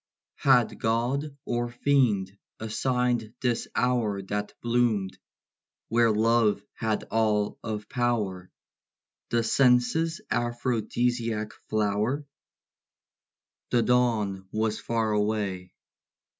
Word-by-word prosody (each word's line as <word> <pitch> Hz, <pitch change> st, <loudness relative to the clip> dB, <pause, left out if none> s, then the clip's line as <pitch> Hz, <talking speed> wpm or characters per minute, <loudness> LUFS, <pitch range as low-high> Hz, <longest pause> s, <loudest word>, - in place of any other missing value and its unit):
Had -, -, +3 dB
God 130 Hz, +6 st, -1 dB
or 120 Hz, 0 st, -1 dB
Fiend 120 Hz, -7 st, +1 dB, 0.2 s
assigned 120 Hz, 0 st, -1 dB
this 120 Hz, -2 st, 0 dB
hour 115 Hz, -6 st, +1 dB
That 105 Hz, +1 st, -3 dB
bloomed, 115 Hz, -5 st, +1 dB, 0.7 s
where 115 Hz, 0 st, +4 dB
love 110 Hz, -1 st, +2 dB
had 110 Hz, -2 st, -1 dB
all 105 Hz, -2 st, +1 dB
of 105 Hz, -2 st, -4 dB
power, 110 Hz, -8 st, -1 dB, 0.8 s
The 115 Hz, -1 st, +1 dB
senses' 135 Hz, +7 st, +3 dB
aphrodisiac 120 Hz, -2 st, -1 dB, 0.2 s
flower? 110 Hz, +7 st, 0 dB, 1.4 s
The 120 Hz, -1 st, +3 dB
dawn 110 Hz, -6 st, +1 dB
was 110 Hz, 0 st, -1 dB
far 115 Hz, -2 st, -1 dB
away. 105 Hz, -3 st, -1 dB
115 Hz, 90 wpm, -27 LUFS, 105-120 Hz, 1.4 s, where